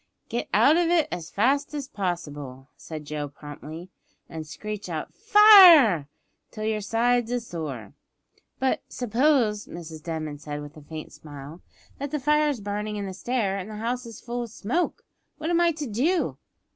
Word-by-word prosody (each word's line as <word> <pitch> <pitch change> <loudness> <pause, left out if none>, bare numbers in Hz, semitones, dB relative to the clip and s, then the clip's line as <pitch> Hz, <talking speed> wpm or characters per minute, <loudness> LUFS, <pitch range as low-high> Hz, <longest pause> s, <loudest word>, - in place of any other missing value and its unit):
"Get - - -3
out 310 +3 +5
of 345 -1 +2
it 335 -3 +3
as 170 -1 -5
fast 280 +7 +1
as 285 -3 -4
possible," 145 - -5
said 155 -2 -8
Joe 150 0 -4
promptly, 155 +5 -10 0.4
"an' 160 -1 -6
screech 205 +5 -7
out 160 -2 -5
fire! 375 - +8 0.4
till 215 - -7
yer 215 -1 -1
sides 235 +2 +1
is 245 -1 -2
sore." 145 - -6 0.6
"But 265 0 0
suppose," 240 -3 +1
said - - -10
Mrs 160 -2 -8
Denman, 155 -3 -5 0.2
with 145 0 -11
a 155 - -12
faint 155 +1 -9
smile, 145 +2 -11 0.4
"that 285 +1 -3
the 300 - -2
fire 300 +2 +3
is 265 -7 -3
burning 210 +1 -3
in 205 -1 -3
the 190 - -5
stair, 200 -2 -1
and 195 +2 -7
the 215 - -7
house 235 0 -4
full 240 +1 -4
of 235 - -5
smoke, 240 - -2 0.3
what 315 +2 -3
am 345 0 +3
I 340 -1 +4
to 305 -1 -5
do?" 280 - 0
215 Hz, 170 wpm, -25 LUFS, -, 0.6 s, fire